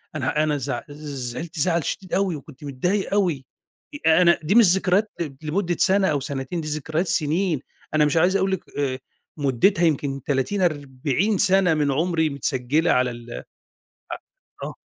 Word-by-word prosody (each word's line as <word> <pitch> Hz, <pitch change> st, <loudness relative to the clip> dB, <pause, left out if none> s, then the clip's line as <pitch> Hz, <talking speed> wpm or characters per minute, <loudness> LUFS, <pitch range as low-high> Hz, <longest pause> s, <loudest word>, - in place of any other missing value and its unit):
أنا 150 Hz, +2 st, 0 dB
أنا 150 Hz, -1 st, 0 dB
زع 140 Hz, +1 st, -3 dB
زعلت 145 Hz, +2 st, -6 dB
زعل 170 Hz, +1 st, +1 dB
شديد 185 Hz, +6 st, -5 dB
أوي، 190 Hz, -3 st, +1 dB
وكنت 145 Hz, -1 st, -12 dB
متضايق 175 Hz, +10 st, -1 dB
أوي، 175 Hz, -10 st, +1 dB, 0.6 s
أنا 170 Hz, +2 st, +5 dB
دي 190 Hz, +8 st, +1 dB
مش 235 Hz, -, +8 dB
ذكريات 195 Hz, +3 st, +1 dB, 0.3 s
لمدة 175 Hz, +3 st, -1 dB
سنة 195 Hz, 0 st, +3 dB
أو 150 Hz, -4 st, +1 dB
سنتين، 140 Hz, +5 st, -4 dB
دي 155 Hz, -, -6 dB
ذكريات 155 Hz, +4 st, -2 dB
سنين، 160 Hz, -1 st, 0 dB, 0.3 s
أنا 150 Hz, -1 st, +4 dB
مش 150 Hz, +3 st, +1 dB
عايز 180 Hz, +4 st, +3 dB
أقول 190 Hz, -, 0 dB
لِك 190 Hz, -, -2 dB, 0.2 s
آآ، 130 Hz, -2 st, -1 dB, 0.4 s
مدتها 145 Hz, -, +2 dB
يمكن 140 Hz, -3 st, 0 dB
30 145 Hz, +8 st, -1 dB
40 150 Hz, +5 st, 0 dB
سنة 190 Hz, -3 st, +3 dB
من 150 Hz, -2 st, +1 dB
عمري، 160 Hz, +2 st, +1 dB
متسجِّلة 140 Hz, +2 st, 0 dB
على 125 Hz, -1 st, +2 dB
ال 120 Hz, 0 st, -10 dB
ع -, -, -7 dB, 1.3 s
آه. -, -, -9 dB
155 Hz, 155 wpm, -23 LUFS, 140-180 Hz, 1.3 s, مش